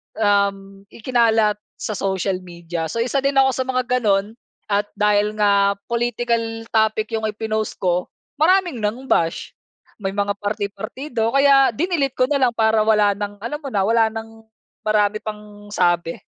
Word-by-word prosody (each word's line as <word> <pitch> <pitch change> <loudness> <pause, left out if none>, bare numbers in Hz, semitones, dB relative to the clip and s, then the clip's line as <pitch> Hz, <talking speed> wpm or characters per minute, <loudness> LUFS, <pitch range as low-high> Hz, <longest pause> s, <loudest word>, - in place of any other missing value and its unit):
um, 200 -2 0
ikinalat 225 -3 +2 0.2
sa 215 - -3
social 190 -1 -1
media. 170 -2 -5
So, 230 - -3
isa 255 +3 0
din 275 0 +1
ako 270 0 +5
sa 260 - 0
mga 255 -1 0 0.2
ganoon 205 -2 +1 0.4
at 205 +1 +1
dahil 210 0 +2
nga 200 -1 +3
political 235 -1 -1
topic 220 0 +1
'yung 220 0 -1
ipinost 215 0 -3
ko, 180 -1 0 0.3
maraming 350 -4 +3
nang 220 +5 -3
bash. 165 -7 0 0.5
May 195 -1 -3
mga 205 0 0
parti-partido, 215 +4 -3
kaya 275 -3 +5
dinilete 295 - 0
ko - - +2
na 280 +2 +1
lang 250 -3 +2
para 220 -1 +3
wala 210 -2 +4
ng 205 0 -5
alam 295 +6 -4
mo 290 - -8
na, 205 -7 0
wala 225 +2 +3
ng 225 0 -9 0.4
marami 215 0 +1
pang 210 -1 -9
sabi. 175 -2 +1
215 Hz, 155 wpm, -21 LUFS, 200-240 Hz, 0.5 s, ako